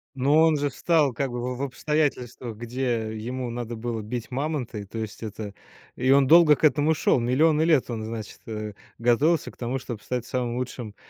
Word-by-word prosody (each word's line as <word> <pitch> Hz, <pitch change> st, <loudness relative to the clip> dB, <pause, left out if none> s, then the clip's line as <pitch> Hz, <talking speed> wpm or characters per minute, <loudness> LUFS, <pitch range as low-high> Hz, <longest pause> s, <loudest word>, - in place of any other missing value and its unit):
Но 135 Hz, +3 st, +2 dB
он 160 Hz, -2 st, +4 dB
же 145 Hz, 0 st, 0 dB
встал, 150 Hz, -3 st, +2 dB
как 135 Hz, +1 st, -2 dB
бы, 120 Hz, -, -4 dB
в -, -, -7 dB
в -, -, -6 dB
обстоятельствах, 130 Hz, -4 st, -2 dB
где 120 Hz, -2 st, -2 dB
ему 125 Hz, +2 st, -4 dB
надо 120 Hz, -1 st, -4 dB
было 115 Hz, -1 st, -3 dB
бить 120 Hz, +3 st, -5 dB
мамонта. 135 Hz, -5 st, -2 dB
И 100 Hz, -, -7 dB
то 115 Hz, -, -9 dB
есть, 110 Hz, -1 st, -5 dB
это, 105 Hz, -1 st, -6 dB, 0.4 s
и 130 Hz, +1 st, 0 dB
он 135 Hz, -1 st, +5 dB
долго 165 Hz, -2 st, +7 dB
к -, -, -15 dB
этому 155 Hz, +1 st, +4 dB
шел. 130 Hz, -, +2 dB
Миллионы 150 Hz, +6 st, +3 dB
лет 160 Hz, -6 st, +3 dB
он, 115 Hz, -2 st, -3 dB
значит, 110 Hz, -1 st, -6 dB
э, 105 Hz, -1 st, -5 dB, 0.2 s
готовился 135 Hz, +8 st, +2 dB
к -, -, -24 dB
тому, 125 Hz, +2 st, -2 dB
чтобы 120 Hz, -4 st, -7 dB
стать 125 Hz, -2 st, -3 dB
самым 120 Hz, -1 st, -2 dB
лучшим 120 Hz, -4 st, -5 dB
125 Hz, 200 wpm, -25 LUFS, 115-140 Hz, 0.4 s, долго